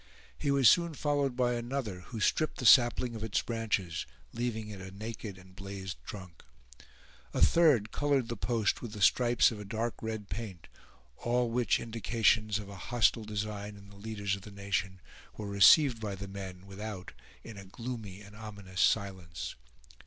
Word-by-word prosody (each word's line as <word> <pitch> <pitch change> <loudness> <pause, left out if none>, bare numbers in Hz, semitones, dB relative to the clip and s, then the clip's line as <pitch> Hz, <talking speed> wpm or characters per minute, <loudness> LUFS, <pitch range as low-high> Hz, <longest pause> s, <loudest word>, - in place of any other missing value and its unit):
He 145 - -2
was 140 -3 +5
soon 170 -3 +5
followed 145 -3 0
by 125 -1 +2
another, 120 -5 -3
who 115 - -6
stripped 155 +9 +1
the 125 - -4
sapling 120 0 +6
of 110 -1 -5
its 110 -3 0
branches, 105 -8 -2 0.3
leaving 115 -2 -3
it 100 -3 -8
a 95 - -7
naked 105 0 -7
and 95 0 -16
blazed 95 -1 -6
trunk. 90 -5 -9 0.9
A - - 0
third 125 - +5
colored 140 -4 +1
the 120 - -3
post 115 -1 0
with 110 -3 -7
stripes 120 +2 +5
of 110 - -7
a - - -6
dark 110 +3 -2
red 110 -2 -4
paint; 100 -8 -6 0.5
all 120 0 0
which 120 0 +2
indications 110 -2 +1
of 105 -2 -7
a 100 -1 -9
hostile 120 -2 +3
design 105 -1 -4
in 100 0 -14
the 100 - -15
leaders 100 -1 -3
of 100 - -10
the 105 - -10
nation 100 -2 -3 0.4
were 105 - -5
received 115 +5 +6
by 105 -2 -3
the 100 +1 -7
men 95 -2 -8
without 100 -1 -7 0.3
in 115 - -9
a 100 - -10
gloomy 105 -2 -7
and 105 0 -13
ominous 100 -4 -6
silence. 90 - 0
105 Hz, 170 wpm, -31 LUFS, 100-120 Hz, 0.9 s, sapling